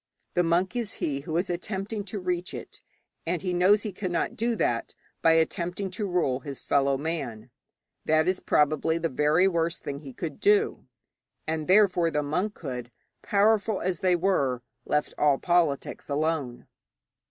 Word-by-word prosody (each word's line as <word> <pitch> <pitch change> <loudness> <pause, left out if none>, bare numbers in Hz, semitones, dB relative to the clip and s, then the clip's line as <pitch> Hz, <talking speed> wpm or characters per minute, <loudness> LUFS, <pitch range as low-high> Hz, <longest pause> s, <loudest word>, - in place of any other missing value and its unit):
The 175 - +3
monk 175 +5 +1
is 235 -4 -2
he 140 -2 -2
who 155 +3 -3
is 180 +3 0
attempting 195 +4 -3
to 205 +2 -5
reach 180 -1 -2
it, - - -9 0.5
and 175 +1 -1
he 180 -2 -1
knows 190 +4 +4
that 215 - -2
he - - -9
cannot 180 -3 -2
do 235 +1 0
that 120 - -1 0.3
by 165 - +5
attempting 175 +4 0
to 205 +1 -3
rule 170 -8 +1
his 140 0 -7
fellow 140 -1 +2
man; 130 -7 -4 0.5
that 155 +1 +3
is 185 0 +1
probably 155 +2 +2
the 165 0 -1
very 150 +7 +3
worst 170 -2 -1
thing 140 0 -4
he 140 -3 -9
could 155 +3 -6
do. 415 +1 +2 0.6
And 155 -1 -2
therefore 185 -3 +4
the 150 -2 -1
monkhood, 145 - -3 0.3
powerful 210 0 +2
as 180 -2 -2
they 185 -1 +3
were, 140 -9 +1 0.2
left 150 0 0
all 145 -2 +4
politics 170 -6 0
alone. 145 -4 -1
170 Hz, 165 wpm, -27 LUFS, 150-190 Hz, 0.6 s, by